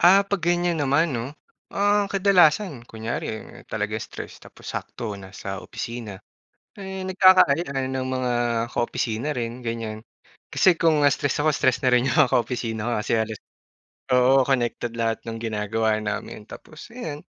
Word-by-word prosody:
Ah, 190 +3 +7
'pag 200 -1 -2
ganiyan 175 -1 +1
naman 145 +3 +2
'no, 125 +4 -4 0.3
ah, 205 0 +2
kadalasan 185 - +3
kunwari 110 -1 -4 0.2
talaga - - -2
stress - - -8
tapos - - -16
sakto 110 -3 -5
nasa 95 0 -7
opisina, 115 -4 -6 0.6
eh, 190 -1 -6
nagkakaayaan 170 -8 +4
ng 130 0 -2
mga 130 -1 -1 0.4
ka-opisina 120 +2 -1
rin, 120 +1 -4
ganiyan. 115 -2 -4 0.5
Kasi 185 - +4
kung, 155 -3 +4
ah, 145 - +5
stress 145 - -1
ako 155 - +3
stress 130 -3 +2
na 125 - +4
rin 125 +2 +3
'yong 130 - 0
mga 125 - -7
ka-opisina 115 -1 -1
ko - - -1
kasi 105 - -3
halos 110 -1 -5 0.7
oo, 130 +1 +5
connected 120 -2 -1
lahat 115 -1 0
nang 115 - -4
ginagawa 110 0 -1
namin. 105 0 -4
Tapos, 155 +6 -12
ayan, 160 -12 -6
130 Hz, 150 wpm, -24 LUFS, 115-165 Hz, 0.7 s, Ah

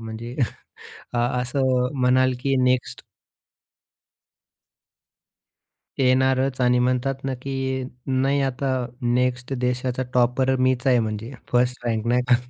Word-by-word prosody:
म्हणजे 115 +2 -7 0.8
अ, 120 - -1 0.2
असं 125 0 +1
म्हणाल 130 +1 +3
की 135 -1 +1
नेक्स्ट 125 0 0 3.0
येणारच 130 0 +2
आणि 125 0 +3
म्हणतात 130 +2 +1
ना 135 -1 -2
की 135 -1 -2 0.2
नाही 135 +1 +1
आता 135 0 -1 0.3
नेक्स्ट 125 +2 0
देशाचा 125 0 -1
टॉपर 125 +2 +2
मीच 130 0 +1
आहे 125 -2 +5
म्हणजे 110 +2 -3 0.2
फर्स्ट 125 0 +1
रँक 110 -1 -1
नाही 125 +1 +3
का. 125 - +7
125 Hz, 110 wpm, -23 LUFS, 125-130 Hz, 3.0 s, का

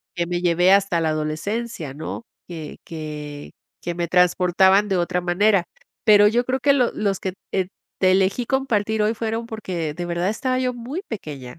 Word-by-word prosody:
que 170 - 0
me 175 0 -2
llevé 175 +1 +4
hasta 195 -3 +3
la 160 -1 +1
adolescencia, 155 - -3
¿no?, 155 +9 -6 0.3
que 160 -4 -7
que, 150 -2 -7 0.3
que 175 - -4
me 170 -1 -2
transportaban 185 +3 +4
de 190 - +1
otra 180 +1 0
manera. 185 +2 +3 0.4
Pero 205 -2 +7
yo 235 +3 +2
creo 255 +1 -1
que 280 0 +4
lo 250 -4 +2
los 200 -2 -1
que 190 - -3 0.7
te 185 -1 +5
elegí 195 +5 +2
compartir 220 -5 0
hoy 215 +1 +2
fueron 225 0 -3
porque 185 -9 -4
de 175 +2 -5
verdad 175 +2 -1
estaba 255 +4 -1
yo 255 -1 0
muy 250 +9 -5
pequeña, 145 - -7
190 Hz, 175 wpm, -22 LUFS, 170-220 Hz, 0.7 s, Pero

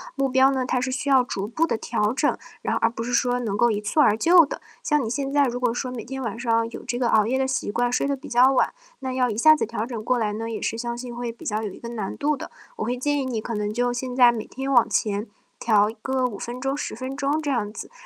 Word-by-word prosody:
目 275 -1 0
标 265 +1 +5
呢， 265 -1 0
它 250 0 0
是 260 +1 -2
需 270 +2 -2
要 265 -2 +6
逐 195 -5 -4
步 315 +10 0
地 - - 0
调 210 0 -1
整， 290 +3 +1 0.2
然 - - -1
而 230 - +2
不 230 0 -5
是 245 - -4
说 245 0 +2
能 215 -5 -2
够 240 +2 +4
一 210 -2 -1
蹴 210 +9 -1
而 210 -7 +5
就 340 +7 +6
的。 - - -7 0.2
像 300 - +1
你 220 - -3
现 275 +3 -2
在 285 -1 +4
如 245 -1 -1
果 245 -2 +1
说 255 +1 -3
每 235 -4 -6
天 265 +2 -6
晚 230 -2 -4
上 230 -1 +1
有 - - -9
这 240 - -2
个 245 -2 +1
熬 215 -1 +4
夜 255 +4 0
的 265 - +1
习 265 -4 -2
惯， 240 +3 0
睡 250 - +1
得 280 - 0
比 260 - -11
较 255 +2 +5
晚， - - +2 0.3
那 260 -1 -4
要 255 -1 +1
一 215 - -3
下 310 +8 +6
子 - - 0
调 230 0 -3
整 235 -3 -5
过 255 - +2
来 215 -3 0
呢， 225 +2 -4
也 225 - -4
是 225 - -2
相 235 0 -3
信 245 0 -7
会 240 -1 -4
比 - - -14
较 215 0 -1
有 210 - -3
一 - - -12
个 235 - -7
难 215 -5 -4
度 295 0 0
的。 - - -7 0.3
我 - - -2
会 245 - -1
建 290 +3 0
议 - - -3
你 240 -4 -2
可 230 - -5
能 210 0 -2
就 245 +2 +1
现 250 +1 -4
在 245 -2 +7
每 220 -2 -5
天 270 +1 -5
往 240 -3 +5
前 210 +1 -1 0.3
调 210 -2 +3
一 225 - -9
个 265 0 0
5 205 -4 -7
分 245 +1 -6
钟、 270 +1 -1
10 - - -4
分 260 +3 -6
钟 285 +2 0
这 290 -2 -2
样 210 -5 -1
子， - - -8
245 Hz, 315 characters per minute, -24 LUFS, 230-265 Hz, 0.3 s, 在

